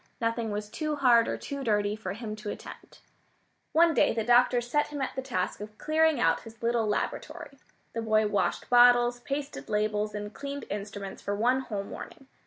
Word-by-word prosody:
Nothing 230 -1 -1
was 210 0 -3
too 305 +7 -3
hard 245 -5 +5
or - - -2
too 280 -1 -6
dirty 210 -3 +1
for 195 -3 -5
him 215 0 -6
to 215 -1 -6
attempt. - - -10 0.7
One 330 +1 +5
day - - +3
the 225 - 0
doctor 245 +1 +4
set 245 +5 0
him 295 -1 -6
at 270 - -3
the 265 - -2
task 205 -8 -3
of 210 0 -9
clearing 315 -2 +2
out 165 -7 +3
his 225 0 -14
little 230 -1 +1
laboratory. 275 +6 -4 0.3
The 230 - -2
boy 220 -1 +2
washed 200 -4 0
bottles, 245 0 +5
pasted 280 +3 -5
labels, 210 0 0
and 210 0 -5
cleaned 280 0 -6
instruments 200 -1 -6
for 200 - -2
one 245 +5 +2
whole 210 -6 -4
morning. 270 +6 -9
230 Hz, 190 wpm, -28 LUFS, 210-265 Hz, 0.7 s, hard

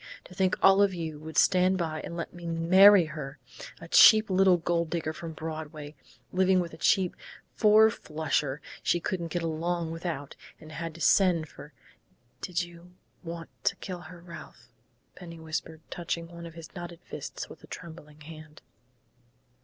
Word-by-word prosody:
To - - -14
think 185 0 +1
all 195 +1 +6
of 200 -2 +3
you 160 -3 -5
would 160 +1 -8
stand 185 +1 +4
by 160 -3 -3
and 170 - -7
let 170 - -5
me 175 -1 -9
marry 180 +3 +6
her 150 -2 -7 0.4
a - - -10
cheap 215 +4 +7
little 185 -1 +5
gold 170 -1 -1
digger 160 -2 -2
from 165 0 -7
Broadway, 155 -2 -7 0.4
living 190 0 +3
with 170 -2 -3
a - - -10
cheap 185 +1 +2 0.4
four 220 0 +5
flusher 150 -6 -2 0.2
she 175 - +1
couldn't 175 -1 -3
get 170 +1 -3
along 165 +1 -2
without 165 -4 -5 0.2
and 155 - -13
had 165 +1 -6
to 165 - -11
send 170 -2 +3
for 150 - -13 0.3
" 120 +1 -39
"Did 180 -2 -2
you 175 +1 -14 0.3
want 165 -1 -7
to - - +1
kill 180 -2 -7
her, 175 -1 -12
Ralph?" 170 -6 -12 0.4
Penny 170 -2 -11
whispered, 160 0 -5
touching 170 -1 -4
one 170 0 -9
of 165 - -13
his 165 -1 -11
knotted 175 -2 -8
fists - - -7
with - - -14
a - - -13
trembling 155 -3 -11
hand. 155 0 -12
170 Hz, 170 wpm, -28 LUFS, 160-180 Hz, 0.4 s, cheap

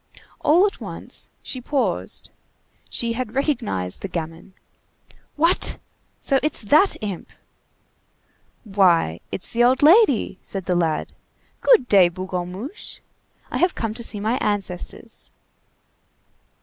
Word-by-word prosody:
All 340 +6 +5
at 410 - -3
once - - -5
she 255 - -5
paused. 270 +2 -2 0.6
She 235 -1 -1
had 240 -1 -4
recognized 230 - -1
the - - -3
gamin. 165 0 -6 0.8
"What! 330 +4 +2 0.4
so 270 -2 +2
it's 305 -6 +1
that 310 - +4
imp!" 200 -5 -5 1.3
"Why, 180 - +2
it's 185 - -3
the 235 +1 +2
old 255 +3 +3
lady," 305 - +5
said 195 -3 -6
the 180 - 0
lad. 165 -3 0 0.5
"Good 470 - +4
day, 190 -5 +6
Bougonmuche. 185 - -6 0.5
I - - -2
have 360 0 +2
come 225 -2 -2
to 235 - -5
see 220 -3 -1
my 220 +5 0
ancestors." 205 +2 -4
220 Hz, 120 wpm, -22 LUFS, 185-275 Hz, 1.3 s, day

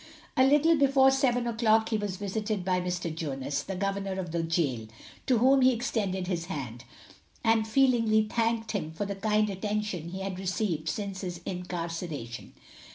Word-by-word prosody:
A 260 - +5
little 295 +4 +5
before 275 -2 +5
seven 255 -3 +2
o'clock 225 -1 +2
he 220 - +1
was 205 -3 -3
visited 205 -1 -3
by 185 -1 +1
Mr. 180 -2 -3
Jonas, 140 -3 -3
the 190 +6 -5
governor 195 0 -2
of 175 -3 -4
the 170 0 0
gaol, 155 -9 -1 0.4
to 255 - +4
whom 265 +4 +5
he 260 0 +6
extended 205 -6 -1
his 175 -2 -2
hand, 130 -8 -6 0.6
and 225 -1 +3
feelingly 230 -3 +3
thanked 225 0 -1
him 175 -7 -3
for 185 +6 -3
the 200 - -3
kind 210 +2 +1
attention 205 -3 -3
he 190 +2 -6
had 190 -1 -4
received 185 -4 -1
since 195 +1 -4
his 175 -3 -5
incarceration. 170 -8 -5
195 Hz, 165 wpm, -28 LUFS, 175-225 Hz, 0.6 s, he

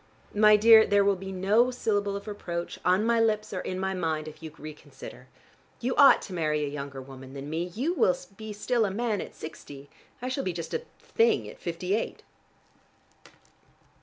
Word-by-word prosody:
My 210 0 +6
dear, 220 +1 +7
there 205 0 +4
will 200 -1 +3
be 190 +1 -7
no 200 +6 +3
syllable 205 -5 -1
of 200 +2 -7
reproach, 175 -4 -5
on 185 +4 +3
my 235 0 +3
lips 215 -2 +1
or 185 - -2
in 185 - -4
my 190 0 -1
mind, 160 -4 -2
if 155 - -11
you 160 -1 -8
reconsider. 155 0 -11 0.5
You 250 +2 -1
ought 280 -1 +7
to 190 - -8
marry 155 -3 0
a - - -4
younger 140 -1 -6
woman 130 0 -11
than 140 +2 -7
me. 165 +2 -1
You 245 - -2
will 180 - +2 0.2
be 220 +1 -8
still 230 +3 0
a - - -1
man 215 +1 -1
at - - -9
sixty, 145 -3 -10 0.3
I 250 - -5
shall 260 +2 -2
be 185 - -2
just 165 -1 -6
a 480 - -3
thing 460 0 +1
at - - -11
fifty 180 +2 -3
eight." 220 - -2
190 Hz, 195 wpm, -27 LUFS, 160-220 Hz, 0.5 s, dear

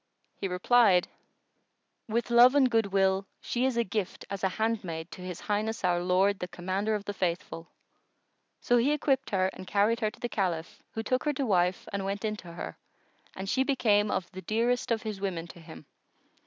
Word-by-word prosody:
He 195 - -4
replied, 185 0 +4 1.0
"With 235 +2 -1
love 245 +3 +7
and 265 -3 +4
goodwill, 195 -3 +2
she 245 +1 -1
is 260 -3 0
a 235 - +3
gift 205 -2 -4
as 195 -1 -4
a 190 - +3
handmaid 185 -6 -2
to - - -9
His 180 -2 -6
Highness 215 +1 -2
our 175 -1 +2
Lord 190 +2 +2
the 180 - -3
Commander 190 +5 -2
of 205 -1 -5
the 205 - -3
Faithful." 170 -3 -3 0.9
So 245 - +3
he 260 +5 +3
equipped 270 -2 0
her 190 -1 +1
and 185 - -10
carried 210 +4 +2
her 215 -3 +1
to - - -17
the 240 - -2
Caliph, 190 -2 -2
who 225 - -2
took 255 +2 0
her 295 - +2
to 275 0 -1
wife 180 -4 +1
and 200 -1 -2
went 200 +3 -3
in 215 0 -1
to 175 -4 -10
her, - - -7 0.6
and 190 +1 -5
she 260 +6 +2
became 215 -6 +2
of 180 - -1
the 190 -1 -8
dearest 235 +4 0
of 230 -2 0
his 210 -3 -5
women 180 -4 -2
to 170 - -12
him. 160 -2 -12
205 Hz, 195 wpm, -29 LUFS, 185-230 Hz, 1.0 s, love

